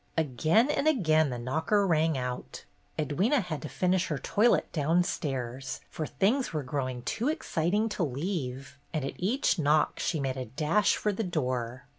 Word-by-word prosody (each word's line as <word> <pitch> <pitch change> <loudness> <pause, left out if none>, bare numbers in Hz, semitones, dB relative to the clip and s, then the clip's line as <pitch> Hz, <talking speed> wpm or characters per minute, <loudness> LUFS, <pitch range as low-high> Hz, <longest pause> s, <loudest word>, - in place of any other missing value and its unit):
Again 160 - +3
and 295 - 0
again 160 - +3
the 125 - -3
knocker 160 - +1
rang 160 -4 +2
out. 125 - -5 0.3
Ed 150 0 -2
wyna 245 +9 +4
had 175 -8 -4
to 155 - -6
finish 185 0 +1
her 150 - -2
toilet 210 - +2
downstairs, 140 -6 -1
for 155 - -4
things 245 +7 +1
were 155 -3 -2
growing 130 -2 -3
too 230 - -2
exciting 210 - 0
to 205 - -4
leave, 140 -3 -4 0.2
and 150 -3 -1
at - - -4
each 205 +1 +1
knock 150 0 +2
she 160 - -1
made 135 -1 -2
a 130 - -3
dash 150 - +1
for 210 - 0
the 220 - -2
door. 125 - -2
155 Hz, 170 wpm, -29 LUFS, 130-190 Hz, 0.3 s, wyna